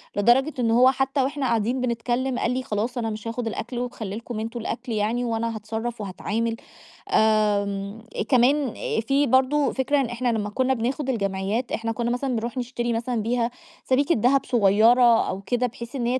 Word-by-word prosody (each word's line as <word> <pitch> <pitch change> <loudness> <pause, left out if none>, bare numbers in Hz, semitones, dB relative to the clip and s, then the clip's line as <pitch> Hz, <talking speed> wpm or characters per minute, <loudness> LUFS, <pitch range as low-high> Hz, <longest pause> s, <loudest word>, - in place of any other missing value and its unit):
لدرجة 245 +8 +3
أنه 230 -1 +3
هو 255 +1 +7
حتّى 270 +1 0
وإحنا 275 +1 -2
قاعدين 235 +2 0
بنتكلّم 245 +1 -1
قال 235 - 0
لي: 255 +1 -2
"خلاص 225 +3 -2
أنا 225 -2 -1
مش 215 +1 -6
هاخُد 230 +1 -3
الأكل 240 +2 -4
وخلّي 230 -5 -4
لكم 230 0 -6
أنتم 230 +2 -4
الأكل 235 +2 -5
يعني 225 +3 0
وأنا 230 0 -2
هاتصرّف 220 +2 -4
وهاتعامل." 215 +4 -2 0.6
آمم 205 -1 +1 0.3
كمان 265 0 +3 0.3
في 275 +5 +1
برضه 265 +3 +3
فكرة 275 +2 +1
إن - - 0
إحنا 240 +1 -2
لمّا 210 -2 -2
كُنّا 260 +5 +1
بناخُد 260 +3 -2
الجمعيّات، 200 +1 -1
إحنا 225 0 -2
كُنّا 235 +1 -2
مثلًا 255 +1 -1
بنروح 235 +3 -3
نشتري 240 -1 -2
مثلًا 230 0 -1
بيها 235 +2 0 0.3
سَبيكة 280 +5 +2
دهب 255 +5 +2
صغيرة 230 +2 +5
أو 190 +1 -4
كده 245 +5 0
بحيث 235 +2 -9
إن 245 -3 -2
هي 250 +2 +1
235 Hz, 180 wpm, -24 LUFS, 220-255 Hz, 0.6 s, هو